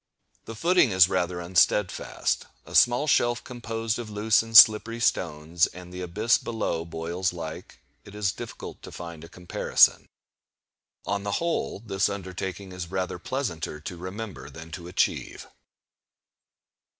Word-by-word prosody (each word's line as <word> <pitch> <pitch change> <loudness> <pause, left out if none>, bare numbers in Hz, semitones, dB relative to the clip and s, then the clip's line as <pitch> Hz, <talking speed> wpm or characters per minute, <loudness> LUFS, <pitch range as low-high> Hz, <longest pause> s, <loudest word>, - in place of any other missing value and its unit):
The 115 - -8
footing 170 +2 +3
is 95 -3 +6
rather 90 -1 -1
unsteadfast, 90 +3 +1 0.2
a - - -12
small 120 +4 +4
shelf 120 -5 +2
composed 115 -2 -4
of 115 -2 -6
loose 105 +1 +2
and 115 0 +4
slippery 115 +1 +7
stones; 80 -5 +1
and 90 0 -12
the 90 - -6
abyss 105 +7 +1
below 105 -8 -3
boils 85 +3 -3
like—it 80 0 -10
is 105 -2 0
difficult - - -9
to - - -10
find 85 -2 -9
a 85 - -11
comparison. 90 0 +2 1.0
On 100 0 -1
the 100 0 -3
whole, 170 +6 -1
this 100 -4 0
undertaking 95 0 -6
is 90 -2 -6
rather 95 -1 -3
pleasanter 85 - -4
to 90 - -6
remember 95 +4 -7
than 80 +1 -11
to 85 +1 -8
achieve. 90 - -1
95 Hz, 140 wpm, -26 LUFS, 85-110 Hz, 1.0 s, slippery